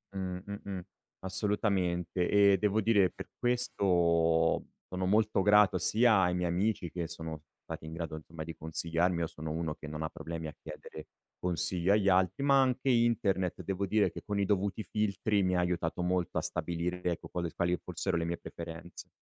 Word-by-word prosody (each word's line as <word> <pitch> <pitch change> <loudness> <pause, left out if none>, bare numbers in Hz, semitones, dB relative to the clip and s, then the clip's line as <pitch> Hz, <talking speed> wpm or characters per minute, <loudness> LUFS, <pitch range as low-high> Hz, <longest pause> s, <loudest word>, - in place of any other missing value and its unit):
Mh, 90 -1 -3
mh-mh, 100 -2 -6 0.4
assolutamente. 95 -3 0
E 100 -1 +5
devo 105 +2 +1
dire, 100 -4 +4
per - - -9
questo 85 -9 +2 0.2
sono 95 0 -3
molto 105 0 +3
grato 105 -2 +5
sia 110 +2 +4
ai 90 -1 +2
miei 90 -1 0
amici, 95 0 0
che 85 -2 -3
sono 80 -2 -7 0.2
stati - - -7
in 80 - -7
grado, 85 -2 -4
insomma, 80 +1 -8
di 80 +1 -7
consigliarmi 85 +2 -1
io 85 - 0
sono 80 0 -6
uno 80 -1 -2
che 75 - -10
non 75 +1 -5
ha 80 - -2
problemi 80 -1 -6
a 75 - -8
chiedere 75 - -10 0.3
consiglio 90 +1 +1
agli 100 -2 +3
altri; 95 +6 +2
ma 140 -1 +5
anche 130 +1 +1
internet, 115 -7 +2
devo 100 0 -2
dire 105 +2 +2
che - - -8
con 105 -1 -1
i 100 - +2
dovuti 100 +2 0
filtri, 105 -1 0
mi 90 0 +1
ha - - +2
aiutato 90 -1 -1
molto 90 -1 0
a - - -2
stabilire, 85 +2 -3
ecco, 85 -3 -2
quale 85 -1 -2
s - - -18
quali 90 +1 +1
fossero - - -2
le 85 - -1
mie 85 0 -2
preferenze. 85 +1 -9
90 Hz, 185 wpm, -31 LUFS, 85-100 Hz, 0.4 s, E